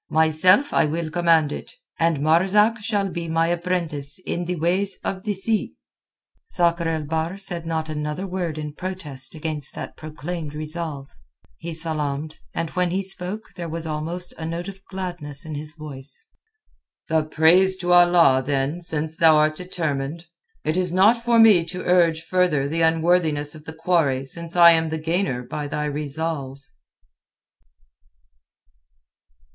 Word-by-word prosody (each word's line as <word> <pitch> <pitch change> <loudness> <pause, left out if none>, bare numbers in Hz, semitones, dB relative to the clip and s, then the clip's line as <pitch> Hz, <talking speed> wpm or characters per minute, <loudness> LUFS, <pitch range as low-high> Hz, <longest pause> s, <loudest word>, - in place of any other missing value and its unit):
Myself 160 - +3
I - - +4
will 160 +1 -3
command 165 -3 +3
it, - - -8 0.2
and 165 -3 +1
Marzak 195 +8 +3
shall 205 -2 -1
be 170 -2 -5
my 165 +1 +1
apprentice 170 -5 -1
in 175 - -2
the 180 +1 -2
ways 180 +5 +2
of 190 -1 -4
the 210 - 0
sea." 215 +3 +1 0.7
Sakr 170 -1 +1
el 160 -1 -2
Bahr 160 +4 -2
said 175 -4 +2
not 160 -1 -2
another 150 +3 -4
word 180 -4 -3
in 150 -1 -5
protest 155 -7 -5
against 155 -2 -4
that - - -7
proclaimed 155 0 -6
resolve. 155 -2 -5 0.5
He 170 - -6
salaamed, 155 -2 -3
and 165 -1 -3
when 180 -1 0
he 190 +3 -1
spoke 195 +3 -4
there 170 -2 -5
was 165 +1 -5
almost 160 +3 -4
a 160 - -4
note 170 +2 -4
of 195 0 -9
gladness 175 -7 -5
in 160 - -6
his 150 +1 -5
voice. 145 - -5 0.8
"The 160 -1 +2
praise 170 +5 +4
to 175 -1 +1
Allah, 175 -7 +6
then, 140 +4 -1
since 160 -1 -1
thou'rt 155 -2 +5
determined. 160 -3 -4 0.4
It 155 +3 -1
is 180 -2 0
not 200 +6 +5
for 235 -1 +3
me 215 -6 +7
to 180 +2 -5
urge 170 -3 +3
further 165 -6 +1
the 165 +3 -1
unworthiness 160 -2 +2
of 155 -1 -13
the 160 - -7
quarry 160 -5 +1
since 170 +5 -5
I 170 -1 +9
am 160 -1 +2
the 160 - -2
gainer 160 -5 -1
by 145 +4 -5
thy 150 +1 -3
resolve." 145 -1 -3
165 Hz, 150 wpm, -23 LUFS, 155-180 Hz, 0.8 s, I